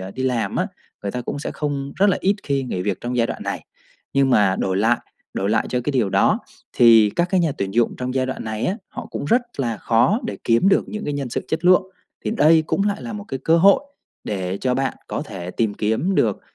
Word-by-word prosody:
à, 95 +1 -6
đi 130 +5 -5
làm 125 -3 -1
á, - - +1 0.4
người 100 -1 -3
ta 125 - -3
cũng 145 - -4
sẽ 145 - -4
không 140 -2 -3
rất 200 +1 +4
là - - +1
ít 195 +2 +2
khi 140 -2 -1
nghỉ 90 -8 -3
việc 100 -2 -2
trong 125 +1 -3
giai 115 - +3
đoạn - - -5
này. - - -4 0.5
Nhưng 135 -1 +3
mà 100 -5 +4
đổi 95 -1 0
lại 115 +4 +3 0.4
đổi 100 +1 -1
lại 110 0 +1
cho 125 - -1
cái 145 - -1
điều 115 -7 +1
đó - - +3 0.3
thì 115 -3 +6
các 175 +1 +2
cái 190 - +3
nhà 165 -4 +1
tuyển 100 +1 -3
dụng 120 -1 +2
trong 125 0 -4
giai 130 -1 +1
đoạn 130 - -5
này 110 0 -2
á, 190 - -1
họ - - -7
cũng - - -4
rất 235 - +3 0.2
là 115 -4 -1
khó 120 - +2
để - - -4
kiếm 115 +12 +3
được - - +2
những 215 0 -5
cái 145 - -2
nhân 140 -2 -3
sự - - -3
chất 160 +1 -2
lượng, 180 +1 +6 0.4
thì - - -1
đây 160 -6 +5
cũng 195 - 0
lại 205 0 -3
là 235 - -6
một 205 -1 -6
cái 135 - -3
cơ 165 +1 +4
hội 195 +3 +6 0.4
để 95 -1 -3
cho 125 -1 0
bạn 135 0 -1
có - - -3
thể 95 - -7
tìm 105 0 -1
kiếm 110 - 0
được, 110 - +1
130 Hz, 260 wpm, -21 LUFS, 110-160 Hz, 0.5 s, thì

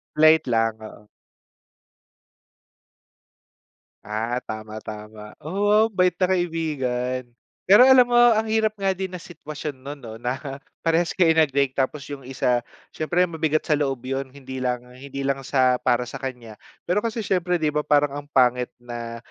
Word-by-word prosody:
Late 155 0 +5
lang, 115 -2 +1
oo. 110 -1 -12 3.0
Ah, 115 +4 -2
tama-tama, 110 0 -8
oh, 205 +6 +2
bait 180 -2 +2
na 185 - +3
kaibigan. 135 -8 -2 0.4
Pero 200 +5 +7
alam 260 -1 +8
mo, 240 - -4
ang 240 -2 +5
hirap 220 -1 0
nga 195 -1 +1
din 190 0 -4
na 180 - -6
sitwasyon 155 -4 -7
non, 140 +2 -7
'no, 120 -5 -10
na 125 +2 -2 0.5
parehas 165 +1 +1
kayo 170 -3 +5
nag-break. 140 -4 +2
Tapos 140 +1 -2
yung 140 - -8
isa 125 -1 0 0.3
siyempre 175 +3 +1
mabigat 160 -3 -1
sa 155 - +2
loob 135 -4 -1
yun, 135 +1 -3
hindi 130 -1 -8
lang 125 -1 -2
hindi 140 +1 -7
lang 135 0 0
sa 130 -2 +2
para 125 0 +1
sa - - -8
kanya. 125 -4 -6 0.3
Pero 195 +4 +1
kasi 225 -1 -3
siyempre 180 -2 +1
'di 155 -3 -1
ba 150 - +1
parang 145 -1 +2
ang 145 - -21
pangit 125 -3 +3
na, 120 -1 -7
140 Hz, 150 wpm, -23 LUFS, 125-175 Hz, 3.0 s, alam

